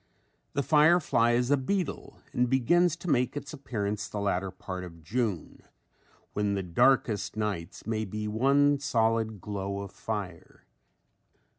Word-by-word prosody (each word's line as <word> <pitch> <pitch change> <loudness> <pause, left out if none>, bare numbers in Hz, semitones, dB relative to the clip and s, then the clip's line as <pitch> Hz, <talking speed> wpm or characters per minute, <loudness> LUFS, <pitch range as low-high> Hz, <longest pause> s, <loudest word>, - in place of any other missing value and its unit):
The 140 - 0
firefly 150 -6 +4
is 125 +2 +1
a 145 - +5
beetle, 180 +7 -3 0.2
and 125 0 +1
begins 160 +7 +3
to 175 - -10
make 125 -2 +1
its 145 0 -6
appearance 105 -7 -3
the 105 - -4
latter 95 -1 0
part 90 0 -7
of 85 -2 -11
June 105 -2 -2 0.7
when 105 -1 0
the 95 - -2
darkest 105 +4 +2
nights 100 -5 -3
may 110 -1 -1
be 105 +2 -4
one 140 +6 +3
solid 115 -5 +1
glow 100 0 -4
of 100 -1 -7
fire. 100 -6 -6
110 Hz, 140 wpm, -29 LUFS, 100-135 Hz, 0.7 s, a